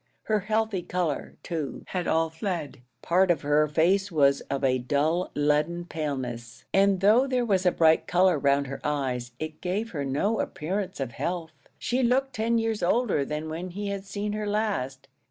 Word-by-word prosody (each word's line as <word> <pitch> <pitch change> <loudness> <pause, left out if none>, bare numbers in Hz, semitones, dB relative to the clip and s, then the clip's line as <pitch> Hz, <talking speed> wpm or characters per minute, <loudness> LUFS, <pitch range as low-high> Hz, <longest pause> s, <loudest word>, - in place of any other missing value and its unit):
Her 215 -1 +1
healthy 215 -1 0
colour, 175 -4 -2
too, 160 -5 -4
had 180 -2 -2
all 160 0 +2
fled; 160 - -4 0.2
part 185 +2 +3
of 165 -5 +2
her 150 +1 +3
face 185 +6 +2
was 140 -3 +3
of 140 - -2
a 130 -1 +3
dull 150 +8 0
leaden 150 +4 +1
paleness, 130 -6 -5
and 195 -1 +4
though 225 +7 +5
there 250 -2 +1
was 190 -4 +2
a - - +5
bright 160 -1 +3
colour 180 -3 +3
round 140 0 +2
her 135 +1 -6
eyes, 130 -4 -2
it 155 +1 -6
gave 205 +5 -2
her 145 -4 -3
no 145 +12 0
appearance 185 +3 -3
of 130 -3 -3
health. 170 +6 -3 0.3
She 250 +2 0
looked 265 +2 +2
ten 230 +2 +1
years 225 -1 -1
older 195 - +2
than 150 +3 -4
when 165 +4 -5
he 200 +3 -4
had 200 -1 -4
seen 205 +1 -3
her 210 0 -3
last. 165 -12 -2
170 Hz, 180 wpm, -27 LUFS, 145-200 Hz, 0.3 s, though